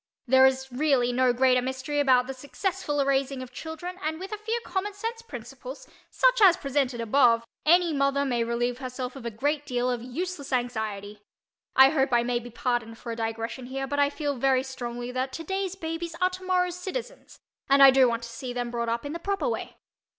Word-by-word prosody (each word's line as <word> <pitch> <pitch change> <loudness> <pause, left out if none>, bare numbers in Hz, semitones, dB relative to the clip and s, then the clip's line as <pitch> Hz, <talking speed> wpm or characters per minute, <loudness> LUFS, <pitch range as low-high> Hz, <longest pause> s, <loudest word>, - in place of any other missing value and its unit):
There 260 +1 +6
is, 265 0 -2
really, 250 -2 +2
no 255 0 +3
great 250 0 +3
mystery 265 +3 -2
about 255 -3 +4
the 270 - -5
successful 290 +1 -2
raising 270 -1 0
of 250 - -11
children 350 +3 -7
and 315 0 -2
with 380 +2 -7
a 425 - -3
few 450 +2 -2
common 405 +2 -2
sense 455 +3 -4
principles, - - -9 0.2
such - - +3
as 370 -3 +7
presented 275 -5 -1
above, 230 0 +3 0.2
any 345 0 +5
mother 275 0 +1
may 240 -3 0
relieve 240 +1 -1
herself 255 0 -5
of 250 -3 -6
a - - -1
great 285 +7 -1
deal 250 -3 -1
of 245 -2 -2
useless 285 +4 -5
anxiety. 215 -5 -3 0.5
I 265 0 +8
hope 270 -4 +1
I 235 0 +4
may 240 0 0
be 240 +1 -10
pardoned 240 -1 -2
for 235 - -7
a - - -3
digression 230 +2 -4
here, 270 +1 -3
but 285 +1 -2
I 285 0 +4
feel 290 -1 -2
very 260 +1 +2
strongly 245 -2 -5
that 255 +1 -2
"today's 385 +4 -3
babies 330 -1 -5
are 365 0 +2
tomorrow's 365 -1 -1
citizens" 485 +7 -6 0.3
and 275 0 +7
I 270 - +10
do 260 -1 +5
want 230 0 -2
to 235 - -7
see 245 +2 -6
them 245 -1 -3
brought 235 -1 -2
up 235 +3 -2
in 285 - -4
the 340 - -5
proper 395 +6 -1
way. 475 - -4
265 Hz, 205 wpm, -27 LUFS, 245-330 Hz, 0.5 s, I